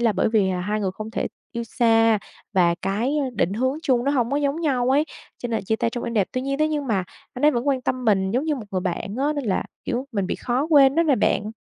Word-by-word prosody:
là 230 -3 +3
bởi 190 - +1
vì, 210 -4 +2
à, 180 -1 -2
hai 210 +3 -1
người 195 -2 0
không 215 +2 -7
thể - - -2 0.3
yêu 235 0 -3
xa 225 -1 +3 0.3
và 175 -3 +3
cái, 235 +10 0
ơ, 270 -3 -1
định 185 -2 +1
hướng 260 +6 0
chung 250 -4 +2
nó 280 - +2
hông 245 -4 +1
có 280 - +1
giống 290 +2 0
nhau 260 -5 +1
ấy, 295 +3 +3 0.3
cho 245 - -4
nên 225 -4 -2
chia 220 +3 0
tay 230 - 0
trong 240 - -4
êm 235 - -4
đẹp. 200 -4 +2
Tuy 255 - -1
nhiên 275 +1 -2
thế 310 0 +2
nhưng 295 -2 -2
mà 195 -6 0 0.3
anh 250 - -2
ấy 300 - +7
vẫn 250 0 -1
quan 260 -2 +1
tâm 255 0 -2
mình 190 -3 +2
giống 250 +7 0
như 310 -2 0
một 245 - -7
người 185 - -1
bạn 195 +4 -3
á, 290 +2 +1
nên 285 - -3
là, 200 -5 0 0.2
kiểu, 260 +1 -2
mình 200 -3 -1
bị - - -2
khó 255 +4 -1
quên 275 -3 +6
đó 335 - +4
nè 290 -6 +3
bạn. 210 0 +1
240 Hz, 290 wpm, -23 LUFS, 210-275 Hz, 0.3 s, ấy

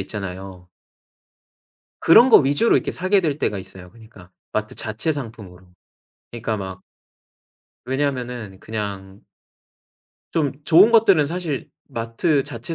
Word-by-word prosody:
있잖아요. 95 -2 -7 1.3
그런 230 +10 +7
거 - - +9
위주로 145 +10 +3
이렇게 - - -1
사게 185 +2 +1
될 150 -5 -2
때가 105 - -1
있어요. 95 -1 -11
그러니까 110 -5 -17 0.2
마트 110 0 -3
자체 110 +8 -1
상품으로. 105 -9 -9 0.7
그러니까 115 -2 -3
막 95 -2 -7 1.0
왜냐하면은 125 -7 -3
그냥 100 -3 -6 1.1
좀 150 -5 0
좋은 180 +9 +6
것들은 200 -10 +5
사실 165 -4 -4 0.2
마트 115 +6 -1
자체 135 +2 -6
115 Hz, 270 characters per minute, -21 LUFS, 95-150 Hz, 1.3 s, 거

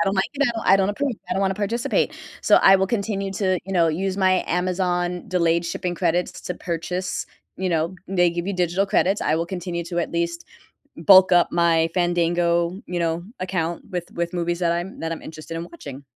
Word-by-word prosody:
I 210 - +3
don't 195 - 0
like 190 - +3
it, 275 -4 +1
I 195 - +6
don't 195 0 +1
approve, 275 +6 -1 0.2
I - - +1
don't 195 - 0
wanna 190 -1 +1
participate. 210 +4 0 0.3
So, - - +5
I 195 0 +7
will 190 0 +1
continue 200 -2 -2
to, 185 -2 +1
you 195 - -6
know, 170 -3 +3
use 185 +4 -1
my 185 -1 +2
Amazon 180 0 -1
delayed 170 -2 +1
shipping 175 +1 -3
credits 175 0 -1
to 180 - -4
purchase, 180 +2 -3 0.3
you 185 0 -2
know, 165 +1 0
they 175 -2 +3
give 170 +1 -4
you 200 - -1
digital 180 +2 +1
credits. 195 +1 +2
I 155 - +1
will 165 +1 -1
continue 175 -2 -4
to 170 +1 -4
at 170 - -2
least 170 0 -2 0.5
bulk 185 +2 +7
up 175 -1 +5
my 165 -1 +3
Fandango, 175 0 +1
you 180 - -3
know, 170 +1 -1 0.2
account 175 -2 -2
with 175 -2 -4
with 170 +1 -3
movies 175 0 -1
that 170 -1 +2
I'm 175 +3 -4
that 165 0 -3
I'm 165 - -6
interested 160 +1 -8
in 165 - -4
watching. 145 -5 -10
175 Hz, 210 wpm, -23 LUFS, 170-190 Hz, 0.5 s, I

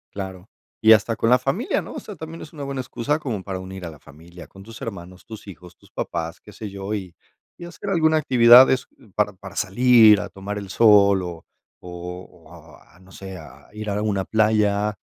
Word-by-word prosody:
Claro. 95 -1 -7 0.3
Y 110 -1 +5
hasta 110 +2 +1
con 115 - 0
la 125 - +5
familia, 135 - -1
¿no? - - -10
O - - -6
sea, 210 - -10
también 160 0 -9
es 155 - -13
una 145 -3 -7
buena 135 -1 -4
excusa 130 +3 -2
como 120 -10 -5
para 95 -1 -5
unir 95 0 -9
a - - -6
la 80 - -13
familia, 85 +4 -14
con 95 - -15
tus 115 +2 -12
hermanos, 95 -4 -9
tus 110 -2 -11
hijos, 90 -2 -13
tus - - -23
papás, 85 -1 -5
qué 105 - -15
sé 105 +1 -8
yo, 100 +1 -6
y 95 -5 -6 0.4
y 175 - -10
hacer 175 +3 -7
alguna 160 -3 +3
actividad 125 -3 +7
es, 130 - -1 0.3
para 105 -1 +1
para 95 0 -12
salir 115 0 +5
a 100 -1 -6
tomar 100 +2 -7
el 100 -1 -7
sol 100 -2 +5
o 85 -2 -8 0.3
o 90 +1 -10
o - - -19 0.3
a, 85 +5 -23
no 95 0 -20
sé, 95 0 -9
a 80 -5 -14
ir 105 0 -6
a - - -1
alguna 105 -2 -1
playa, 105 -1 +1
105 Hz, 215 wpm, -22 LUFS, 95-120 Hz, 0.4 s, actividad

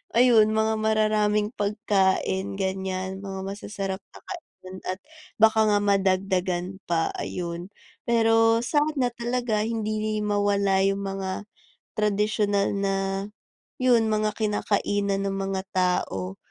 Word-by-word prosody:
ayun, 230 -3 +6
mga 220 0 +1
mararaming 215 -1 +2
pagkain, 195 -2 0
ganyan. 190 0 -2
Mga 195 -1 -5
masasarap 195 -1 -5
na - - -13
kainan 295 - -9
at 185 +1 -3 0.4
baka 220 0 +5
nga 205 - +3
madagdagan 190 -2 0
pa, 165 -1 +1
ayun. 170 0 -4 0.4
Pero 225 -1 +4
sana 290 -1 +1
talaga, 235 -3 -1
hindi 215 -1 -2
mawala 200 -2 +2
yung 195 0 +1
mga 195 +1 -4 0.5
tradisyunal 210 -1 +1
na, 195 0 0 0.8
'yon, 245 -3 +4
mga 215 0 0
kinakainan 205 -2 0
ng 195 - -2
mga 195 -1 -2
tao 95 - 0
205 Hz, 110 wpm, -25 LUFS, 190-215 Hz, 0.8 s, ayun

